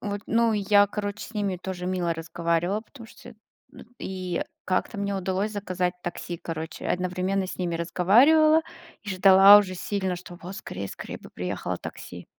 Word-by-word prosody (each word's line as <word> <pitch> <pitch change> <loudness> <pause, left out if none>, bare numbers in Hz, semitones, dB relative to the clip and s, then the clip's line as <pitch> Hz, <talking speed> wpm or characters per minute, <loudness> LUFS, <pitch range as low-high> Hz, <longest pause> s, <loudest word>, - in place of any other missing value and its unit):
вот, 205 -1 -4
ну, 230 0 +2
я, 205 0 +4
короче, 205 +1 -5
с 225 - -14
ними 200 -3 -1
тоже 180 -1 -5
мило 180 -2 -1
разговаривала, 170 +4 -1
потому 230 +1 -14
что - - -14
я. - - -15 0.6
И 185 -2 -3 0.2
как-то 185 +4 -1
мне 200 0 -2
удалось 190 +2 -2
заказать 185 -3 -2
такси, 175 0 -5
короче. 160 0 -6
Одновременно 185 +1 -1
с - - -7
ними 175 -2 -2
разговаривала 265 - +4 0.4
и 205 - -6
ждала 195 +2 +8
уже 185 -3 -2
сильно, 190 0 -2
что 175 0 -11
вот: 180 +3 -8
"Скорей, 95 +1 -6
скорей - - -8
бы - - -14
приехало - - -4
такси!" - - -9
190 Hz, 165 wpm, -26 LUFS, 180-205 Hz, 0.6 s, ждала